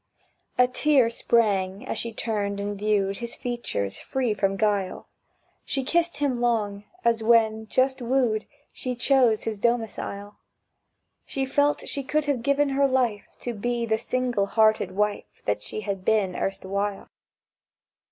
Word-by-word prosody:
A 250 Hz, 0 st, +6 dB
tear 255 Hz, -2 st, +3 dB
sprang 200 Hz, -5 st, +1 dB
as -, -, -2 dB
she 230 Hz, -, -2 dB
turned 205 Hz, -3 st, -2 dB
and 205 Hz, 0 st, -3 dB
viewed 200 Hz, -1 st, 0 dB
His 235 Hz, -1 st, -4 dB
features 235 Hz, -, -3 dB
free 255 Hz, -4 st, -1 dB
from 195 Hz, -1 st, 0 dB
guile; 200 Hz, -3 st, 0 dB, 0.6 s
She 270 Hz, -2 st, -2 dB
kissed 340 Hz, +5 st, +1 dB
him 270 Hz, -4 st, 0 dB
long, 210 Hz, -4 st, 0 dB, 0.2 s
as 230 Hz, -1 st, +3 dB
when, 220 Hz, -1 st, +3 dB
just 260 Hz, +3 st, +1 dB
wooed, 240 Hz, -3 st, +1 dB, 0.3 s
She 255 Hz, -1 st, -3 dB
chose 245 Hz, -3 st, +3 dB
his 220 Hz, -2 st, -3 dB
domicile. 210 Hz, -3 st, -2 dB, 0.9 s
She 270 Hz, -1 st, -2 dB
felt 285 Hz, +2 st, +1 dB
she 280 Hz, -, -2 dB
could 300 Hz, +2 st, 0 dB
have 280 Hz, -5 st, 0 dB
given 280 Hz, +2 st, +2 dB
her 275 Hz, +1 st, +3 dB
life 245 Hz, -6 st, 0 dB
To 240 Hz, -, -3 dB
be 235 Hz, +2 st, -1 dB
the 220 Hz, -1 st, 0 dB
single 245 Hz, -4 st, 0 dB
hearted 220 Hz, -1 st, +3 dB
wife 210 Hz, +1 st, -2 dB
That 105 Hz, 0 st, 0 dB
she 215 Hz, -, -4 dB
had 195 Hz, -3 st, -4 dB
been 195 Hz, -4 st, +2 dB
erstwhile. 195 Hz, +1 st, -3 dB
225 Hz, 145 wpm, -25 LUFS, 205-255 Hz, 0.9 s, A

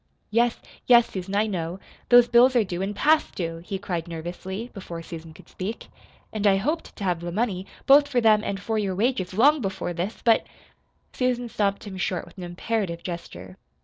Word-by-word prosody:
"Yes, 235 Hz, +1 st, +2 dB, 0.3 s
yes, 240 Hz, -1 st, +6 dB
Susan, 190 Hz, +1 st, -4 dB
I 210 Hz, +2 st, +3 dB
know. 180 Hz, -3 st, -3 dB, 0.3 s
Those 245 Hz, -1 st, +8 dB
bills 245 Hz, +2 st, +5 dB
are 235 Hz, -, +5 dB
due, 180 Hz, -2 st, -4 dB
and 200 Hz, +2 st, -2 dB
past 310 Hz, +7 st, +2 dB
due," 165 Hz, -2 st, -3 dB
he 185 Hz, +3 st, -5 dB
cried 180 Hz, -4 st, -4 dB
nervously, 180 Hz, +7 st, -6 dB
before 170 Hz, -4 st, -7 dB
Susan 165 Hz, -1 st, -9 dB
could 155 Hz, -, -16 dB
speak. 205 Hz, +5 st, -6 dB, 0.4 s
"And 215 Hz, -1 st, +1 dB
I 195 Hz, -, +5 dB
hoped 305 Hz, +11 st, -2 dB
to 205 Hz, -, -7 dB
have 180 Hz, -3 st, 0 dB
the 175 Hz, 0 st, -5 dB
money, 195 Hz, -2 st, -1 dB, 0.2 s
both 285 Hz, +1 st, +7 dB
for 265 Hz, -4 st, +1 dB
them 215 Hz, -2 st, +5 dB
and 195 Hz, -2 st, -3 dB
for 220 Hz, +2 st, -1 dB
your 195 Hz, -3 st, -1 dB
wages, 200 Hz, -4 st, 0 dB
long 285 Hz, +7 st, +5 dB
before 190 Hz, -3 st, -3 dB
this. 180 Hz, +6 st, -3 dB
But 230 Hz, -1 st, +3 dB, 0.3 s
" -, -, -43 dB
Susan 245 Hz, -1 st, -1 dB
stopped 200 Hz, -2 st, -1 dB
him 195 Hz, -2 st, -7 dB
short 185 Hz, -2 st, -2 dB
with -, -, -17 dB
an -, -, -6 dB
imperative 175 Hz, 0 st, -3 dB
gesture. 95 Hz, -, -7 dB
200 Hz, 200 wpm, -25 LUFS, 175-235 Hz, 0.4 s, Those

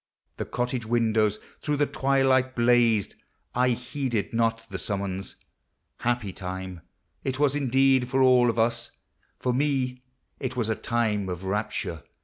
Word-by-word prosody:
The -, -, -3 dB
cottage 125 Hz, 0 st, -2 dB
windows 110 Hz, -3 st, +2 dB, 0.2 s
through 150 Hz, -1 st, 0 dB
the 145 Hz, -, +3 dB
twilight 135 Hz, -2 st, +2 dB
blazed, 120 Hz, -3 st, +3 dB, 0.4 s
I 125 Hz, +1 st, +3 dB
heeded 125 Hz, -2 st, -2 dB
not 115 Hz, 0 st, +1 dB
the 95 Hz, -3 st, -5 dB
summons. 95 Hz, -1 st, -3 dB, 0.6 s
Happy 120 Hz, -5 st, -1 dB
time 95 Hz, -1 st, -6 dB, 0.4 s
It 130 Hz, -1 st, -2 dB
was 145 Hz, -1 st, +2 dB
indeed 135 Hz, -2 st, +3 dB
for 135 Hz, +1 st, +1 dB
all 125 Hz, -2 st, +6 dB
of 115 Hz, -, -1 dB
us; 115 Hz, +1 st, +1 dB, 0.5 s
for 125 Hz, -, 0 dB
me 130 Hz, -2 st, 0 dB, 0.4 s
It 130 Hz, -1 st, -3 dB
was 115 Hz, -3 st, -1 dB
a 110 Hz, -, +1 dB
time 105 Hz, -5 st, 0 dB
of 90 Hz, 0 st, -5 dB
rapture! 100 Hz, -5 st, -2 dB
120 Hz, 140 wpm, -26 LUFS, 105-130 Hz, 0.6 s, all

